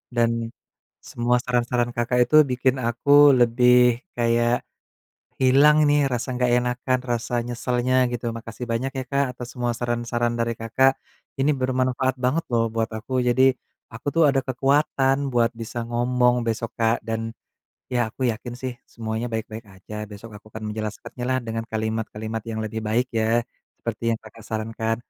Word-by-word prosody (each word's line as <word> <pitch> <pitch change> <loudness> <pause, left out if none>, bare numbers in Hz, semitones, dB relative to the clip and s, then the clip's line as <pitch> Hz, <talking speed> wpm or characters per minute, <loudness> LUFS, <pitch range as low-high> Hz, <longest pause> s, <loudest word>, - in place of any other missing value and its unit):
Dan, 115 -1 +3 0.8
semua 120 +1 0
saran-saran 120 -1 0
Kakak 120 +1 0
itu 155 - +2
bikin 125 +1 +1
aku 120 +4 -2 0.3
lebih 125 0 +5 0.2
kayak, 120 0 +1 0.8
hilang 140 +4 +6
ini 145 0 +3
rasa 125 +1 -2
enggak 125 0 +1
enakan, 125 +1 0
rasa 120 +1 -2
nyeselnya 125 +1 -1 0.2
gitu. 120 -1 -3
Makasih 115 +1 -7
banyak, 130 +4 -1
ya, 130 - -2
Kak, 140 0 +2
atas 125 -1 -7
semua 120 -1 0
saran-saran 120 0 -1
dari 115 0 0
Kakak, 125 +4 +3 0.5
ini 140 +3 +3
bermanfaat 130 0 0
banget, 150 +7 +1
loh, 115 -1 +2
buat 115 +1 0
aku. 130 +4 -2
Jadi, 130 +2 +5 0.4
aku, 115 +4 -11
tuh, 165 -1 +4
ada 135 -1 +1
kekuatan 135 +1 +2 0.2
buat 120 -1 +3
bisa 115 +1 -6
ngomong 125 0 +2
besok, 115 0 -2
Kak, 115 0 +2
dan, 115 0 -2 0.6
ya, 120 -3 0
aku 130 0 -1
yakin, 120 +2 -8
sih, 130 -1 -2
semuanya 110 0 -4
baik-baik 110 0 -5
aja. 95 +3 -11 0.2
Besok 105 +2 -10
aku 105 - -17
akan 110 0 -7
menjelaskannyalah 120 +4 -3
dengan 115 0 -3
kalimat-kalimat 110 0 -3
yang 110 0 -3
lebih 110 +1 -4
baik, 120 +4 +1
ya, 115 +1 +2 0.4
seperti 115 0 -2
yang 115 - -3
Kakak 110 0 -14
sarankan. 110 0 -2
120 Hz, 155 wpm, -23 LUFS, 115-125 Hz, 0.8 s, hilang